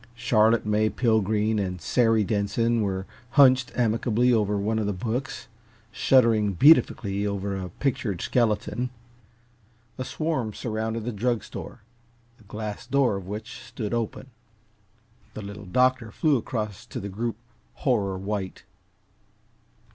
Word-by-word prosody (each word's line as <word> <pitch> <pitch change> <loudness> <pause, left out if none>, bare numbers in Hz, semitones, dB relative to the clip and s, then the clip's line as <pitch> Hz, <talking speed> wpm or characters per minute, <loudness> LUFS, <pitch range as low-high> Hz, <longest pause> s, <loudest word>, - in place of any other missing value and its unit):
Charlotte 115 -1 +3
May 105 +1 +2
Pilgreen 110 -2 +1
and 90 -2 -3
Sary 115 +4 +2
Denson 110 +3 0
were 95 -2 -2 0.3
hunched 130 -3 +6
amicably 120 +1 +2
over 105 -2 +1
one 110 +3 0
of 105 - -1
the 105 - 0
books, 120 +8 -4 0.4
shuddering 115 -6 +3
beatifically 105 - +4
over 100 0 -2
a 95 -1 -5
pictured 120 - -2
skeleton. 120 +3 0 1.1
A - - -1
swarm 135 -7 -2
surrounded 110 -1 -3
the 120 - -2
drug 115 +1 -1
store, - - -9 0.6
the - - -19
glass 105 +2 -6
door 135 -4 +2
of 95 -2 -6
which 110 +3 -6
stood 110 -2 -5
open. 120 +3 -3 1.0
The 110 - -6
Little 100 +1 -8
Doctor 125 +2 +2
flew 150 +6 +2
across 110 -5 -3
to - - -6
the 100 - -5
group, 115 +4 -3 0.4
horror 100 -8 0
white. 95 0 -4
110 Hz, 130 wpm, -25 LUFS, 100-120 Hz, 1.1 s, hunched